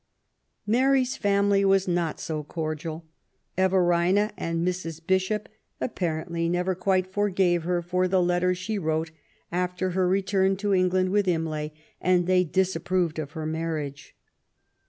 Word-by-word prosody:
Mary's 260 +3 +2
family 200 0 +2
were 195 0 +5
not 175 -3 -1
so 155 -2 -3
cordial. 160 +1 -5 0.5
Everina 185 +2 +3
and 165 +1 -2
Mrs. 170 -3 -3
Bishop 190 +4 0 0.3
apparently 170 -5 -2
never 180 +2 0
quite 185 0 +1
forgave 190 -4 +1
her 175 0 0
for 180 +2 +1
the 185 0 +2
letter 180 +1 +2
she 205 +3 -3
wrote 160 -1 -1 0.4
after 180 +1 -1
her 185 0 +1
return 190 0 +2
to 200 0 0
England 185 0 +2
with 205 -1 +2
Imlay, 160 -3 -1 0.3
and 180 -1 +3
they 185 0 +3
disapproved 180 -1 0
of 150 -1 -5
her 160 -1 -5
marriage. 155 -3 -4
180 Hz, 135 wpm, -26 LUFS, 165-190 Hz, 0.5 s, were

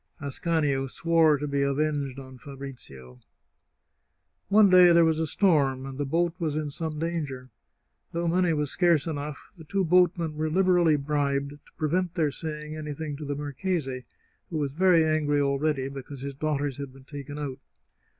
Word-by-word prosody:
Ascanio 140 -1 0
swore 160 +1 +3
to 150 +1 -4
be 140 0 0
avenged 140 -1 -1
on 130 -1 -10
Fabrizio. 125 - -10 1.3
One 210 +1 +6
day 180 -2 +7
there 170 -1 +6
was 160 -1 +1
a 160 - 0
storm, 145 -7 +2
and 135 0 -8
the 145 - -1
boat 170 +3 +1
was 155 -4 -1
in 155 -1 -2
some 155 +1 -4
danger. 150 -6 -4 0.6
Though 170 +1 -2
money 180 0 +2
was 150 -2 -1
scarce 170 -5 +3
enough, 150 -2 -6
the 160 - -11
two 195 +4 -1
boat 180 +1 +4
men 165 -2 -3
were 155 0 -1
Hberally 175 -2 +3
bribed 140 -1 -1
to 145 0 -16
prevent 175 +3 -1
their 155 -5 +1
saying 150 0 -6
anything 150 -1 -5
to 150 - -7
the 145 0 -3
marchese, 145 -2 -3 0.4
who 165 - -3
was 145 -2 -1
very 170 +1 +4
angry 150 -2 +1
already 140 0 0
because 135 0 -8
his 140 0 -5
daughters 145 -1 -2
had 140 -2 -6
been 130 0 -17
taken 145 0 -8
out. 140 -3 -5
150 Hz, 170 wpm, -27 LUFS, 140-165 Hz, 1.3 s, day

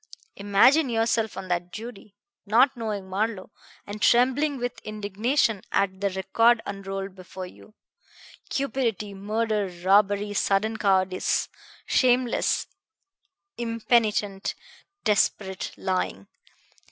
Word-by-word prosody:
Imagine 245 +9 +4
yourself 225 -1 0
on 190 -1 -6
that 175 0 -1
jury, 215 -1 -9 0.3
not 250 +6 +4
knowing 215 -5 -4
Marlowe, 200 +1 -2 0.3
and 205 +1 -7
trembling 265 +4 +3
with 245 -1 -4
indignation 215 +2 0
at 195 -1 0
the 200 - +1
record 225 +5 +3
unrolled 195 -1 -5
before 185 0 -9
you 215 +4 -15 0.7
cupidity, 235 -7 -2
murder, 210 +1 -1 0.2
robbery, 205 +1 +3
sudden 205 +2 +1
cowardice, 190 -2 +1 0.4
shameless, 250 -1 +2 0.9
impenitent, 225 -4 0 0.5
desperate 195 -2 0
lying! 185 - -2
210 Hz, 95 wpm, -25 LUFS, 195-230 Hz, 0.9 s, Imagine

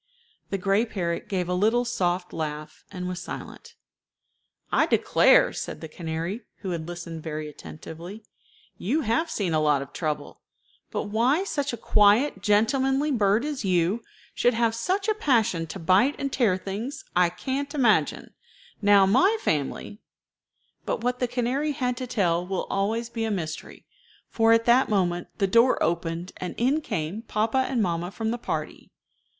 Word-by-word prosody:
The 195 - -1
gray 195 +3 +2
parrot 175 -7 -3
gave 185 -3 -1
a 180 - -1
little 220 +6 +2
soft 180 -6 -1
laugh, 155 -1 -5
and 180 -2 -5
was 180 -1 -4
silent. - - -9 1.0
"I - - +3
declare," - - +4
said - - -5
the 160 - -7
canary, 165 +6 -4 0.2
who 190 - -3
had 165 -2 -4
listened 170 -2 -7
very 155 -1 -5
attentively, 165 +7 -10 0.6
"you 275 - 0
have 280 +7 0
seen 190 - -1
a 155 - +3
lot 150 -2 +2
of 140 - -15
trouble. 155 -3 -4 0.5
But - - -2
why 250 - +2
such 290 -7 -2
a 235 - -5
quiet, 210 +3 +3
gentlemanly 265 +8 +2
bird 215 0 +2
as 295 -5 -3
you 185 +3 +1 0.3
should 245 -1 +2
have 230 -1 +2
such 375 - -1
a 435 - +3
passion 225 - +1
to 160 - -7
bite 190 - +3
and 275 -1 -3
tear 215 -8 +2
things, 205 +8 -6
I 180 -1 +4
can't 275 - -4
imagine. 240 -7 +2 0.5
Now 200 -1 +6
my 365 - +4
family 155 - -2 0.4
" - - -47
But - - -1
what 250 0 0
the 250 - +1
canary 260 +5 -1
had 250 -2 -1
to 255 -1 -4
tell 175 -7 +1
will 190 -1 -2
always 225 +4 -1
be 230 -1 -3
a 225 - -1
mystery, 165 -6 -5 0.4
for 225 0 +2
at 230 0 +4
that 245 +2 +4
moment 175 -4 0
the 200 - +2
door 230 +6 +4
opened 170 +1 -2
and 180 - -5
in 270 +6 +2
came 170 - -3
papa 230 +3 0
and 245 -5 +1
mamma 175 -1 -1
from 220 +3 -3
the 240 - -3
party. - - -5
210 Hz, 165 wpm, -26 LUFS, 175-245 Hz, 1.0 s, Now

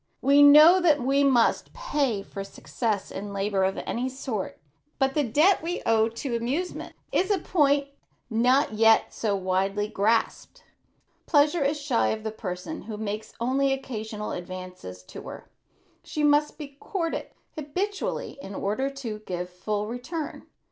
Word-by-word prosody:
We 280 +1 +6
know 305 +6 +8
that 310 -4 +4
we 275 +3 +2
must 255 -4 +2
pay 285 - -1
for 195 0 -7
success 210 +1 -3
in 200 +1 -6
labor 195 -1 0
of 190 0 0
any 250 +2 -2
sort, 255 -6 -5 0.4
but 270 -1 +1
the 295 - +1
debt 305 - +3
we 345 +3 -4
owe 225 0 +3
to 235 +2 -4
amusement 270 +11 -3 0.2
is 380 - +1
a 405 - +3
point 290 -5 +2 0.4
not 245 +2 +2
yet 225 +1 +4
so 210 -3 -1
widely 195 +2 0
grasped. 225 - -1 0.6
Pleasure 300 +1 +3
is 290 +2 0
shy 285 -5 +1
of 220 0 -2
the 220 - -3
person 200 - -6
who 215 -1 -7
makes 215 0 -5
only 270 +3 +1
occasional 220 -5 -4
advances 180 - -8
to - - -10
her. - - -10 0.5
She 300 - -3
must 295 0 +3
be 280 -3 -9
courted 335 -2 -3 0.3
habitually 360 +2 -3
in 195 -4 -8
order 215 +9 -1 0.2
to 215 -2 -4
give 180 -1 -3
a - - -26
full 205 +3 -3
return. 255 +8 -6
245 Hz, 155 wpm, -26 LUFS, 210-290 Hz, 0.6 s, know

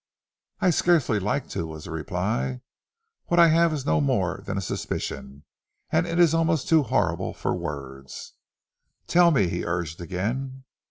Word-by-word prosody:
"I 180 - +4
scarcely 160 -10 +2
like 105 +8 -1
to," 80 - -3
was 80 -1 -8
the - - -8
reply. 65 -5 -2 0.7
"What 175 - +2
I 170 -1 +8
have 165 +1 +4
is 145 -4 -3
no 80 -1 +2
more 70 - 0
than 100 0 -2
a - - +1
suspicion, 70 -5 -5 0.5
and 165 +2 +2
it 170 0 -2
is 170 -3 +5
almost 165 -3 +1
too 160 -1 +5
horrible 135 - -1
for - - -2
words." 70 -2 -7 0.7
"Tell 175 0 +5
me," 130 - +3
he 85 +1 -3
urged 85 -1 -3
again. 125 +10 -4
105 Hz, 160 wpm, -25 LUFS, -, 0.7 s, I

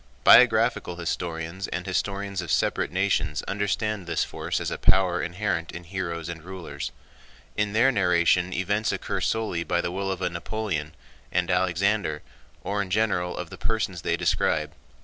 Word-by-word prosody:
Biographical 115 -5 +6
historians 85 +1 -3
and 90 0 -4
historians 100 +1 -2
of 85 - -7
separate - - +1
nations 90 -5 0
understand 100 -1 -1
this - - +1
force - - -3
as - - -3
a - - -4
power 90 -2 +3
inherent 90 -2 -2
in 90 - -8
heroes 85 -2 -4
and 85 -2 -6
rulers. 85 -6 -6 0.6
In 105 -1 0
their 120 +5 +5
narration 90 -3 +3
events 100 +5 0
occur - - -3
solely 110 -7 0
by 85 +1 0
the 85 - -1
will 95 +1 -2
of 95 -1 -3
a - - +2
Napoleon, 85 -4 -3 0.4
and 90 0 +1
Alexander, 90 -2 +1 0.4
or 100 +1 -1
in 100 - -4
general 90 -3 +1
of 90 -2 -5
the - - -9
persons 105 -6 -1
they - - 0
describe. - - +1
90 Hz, 160 wpm, -26 LUFS, 85-100 Hz, 0.6 s, Biographical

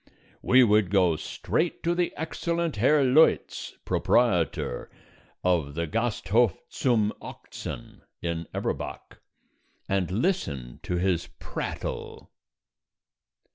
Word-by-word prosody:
We 130 0 +6
would 105 -4 +4
go 90 -4 +3
straight 160 - -2
to 170 - +2
the 175 0 0
excellent 165 -2 -2
Herr 140 +7 +4
Leutz, 135 +5 +3
proprietor - - +1 0.5
of 80 -6 +1
the 85 +1 -1
Gasthof 115 +1 +1 0.2
zum 110 -5 +2
Ochsen - - -8 0.2
in 85 -1 -3
Eberbach, - - -4 0.7
and 95 -3 0
listen 90 - -1
to 90 - -3
his 90 -1 0
prattle. - - -5
105 Hz, 95 wpm, -27 LUFS, -, 0.7 s, We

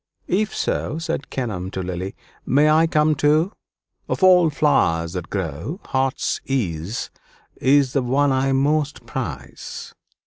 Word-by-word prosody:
"If 210 +4 0
so," 150 - -1
said 165 -4 -3
Kenelm 105 -8 -3
to 95 - -3
Lily, 90 +1 -4 0.3
"may 150 +3 +4
I 160 +2 +5
come 155 -1 +3
too? 150 +5 +2 0.6
Of - - -2
all 180 -3 +7
flowers 85 - +1
that 90 -2 -5
grow, 95 - -4
heart's 130 0 -1
ease 100 -6 -2 0.5
is 135 -1 +3
the 140 - +2
one 135 +3 +2
I 135 +1 +1
most 145 +2 0
prize." - - -6
135 Hz, 135 wpm, -22 LUFS, 95-155 Hz, 0.6 s, all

